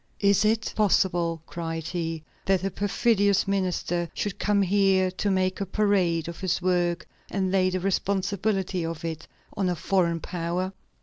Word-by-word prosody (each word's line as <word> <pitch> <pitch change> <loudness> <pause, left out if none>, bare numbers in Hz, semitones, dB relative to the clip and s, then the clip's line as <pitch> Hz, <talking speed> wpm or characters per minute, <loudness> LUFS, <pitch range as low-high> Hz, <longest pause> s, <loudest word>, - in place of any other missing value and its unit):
"Is 200 -1 +4
it 220 +1 +1
possible," 175 -5 +2
cried 165 -1 -4
he, 165 -3 -3 0.2
"that 190 -2 +2
a 195 - -1
perfidious 205 0 +2
minister 180 -3 -1
should 205 -3 -3
come 205 -1 +2
here 190 -1 +3
to 200 +2 -2
make 185 0 0
a - - 0
parade 185 -5 +1
of 170 - -7
his 185 -2 0
work 175 -1 0 0.2
and 190 -1 -1
lay 185 -1 +3
the 185 0 -1
responsibility 195 0 0
of 165 0 -4
it 160 -1 -5 0.3
on 190 -2 0
a 180 - 0
foreign 170 -1 +1
power? 175 +2 -3
185 Hz, 160 wpm, -26 LUFS, 170-200 Hz, 0.3 s, Is